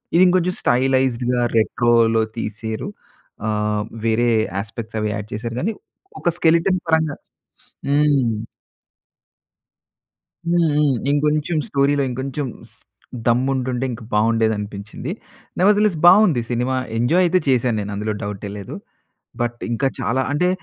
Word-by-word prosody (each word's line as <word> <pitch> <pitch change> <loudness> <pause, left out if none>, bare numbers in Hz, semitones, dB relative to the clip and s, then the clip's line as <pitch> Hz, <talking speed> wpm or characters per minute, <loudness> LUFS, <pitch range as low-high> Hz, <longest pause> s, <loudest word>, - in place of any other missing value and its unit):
ఇది 180 - +7
ఇంకొంచెం 180 0 +2
స్టైలైజ్‌డ్‌గా, 125 -1 +1 0.2
రెట్రో‌లో 115 0 +3 0.2
తీసేరు. 110 0 -4 0.6
ఆహ్, 105 -1 0 0.2
వేరే 120 +2 +2 0.3
యాస్పెక్ట్‌స్ 110 +2 -5
అవి 105 - 0
యాడ్ 105 0 -5
చేసారు 115 +2 -4
కానీ, 220 +6 -1 0.5
ఒక - - +2
స్కెలెటన్ 170 +3 +3
పరంగా 160 -2 +2 0.7
హ్మ్. 140 -6 +2 2.1
హ్మ్. 175 -1 +3
హ్మ్. 145 -3 +3 0.2
ఇంకొంచెం 150 +2 +1
స్టోరీలో, 140 0 +2
ఇంకొంచెం 135 +3 -3 0.2
స్ - - -7 0.5
దమ్ము 125 +3 +2
ఉంటుంటే 130 0 -2
ఇంకా 115 0 -7
బాగుండేది 110 +1 +2
అనిపించింది. 105 - -6 0.5
నెవర్‌ద్ 205 +2 +4
లెస్ 205 -6 +2
బాగుంది 180 - +6
సినిమా. 125 +2 0 0.2
ఎంజాయ్ 125 +11 +3
అయితే 180 +1 +3
చేశాను 125 -3 +2
నేను 105 0 -4
అందులో 105 +1 -2
డౌటే 100 0 -5
లేదు. 100 - -7 0.7
బట్ 120 0 -1
ఇంకా 135 +4 0
చాలా 130 +3 0
అంటే 180 +5 +2
125 Hz, 120 wpm, -21 LUFS, 110-150 Hz, 2.1 s, ఇది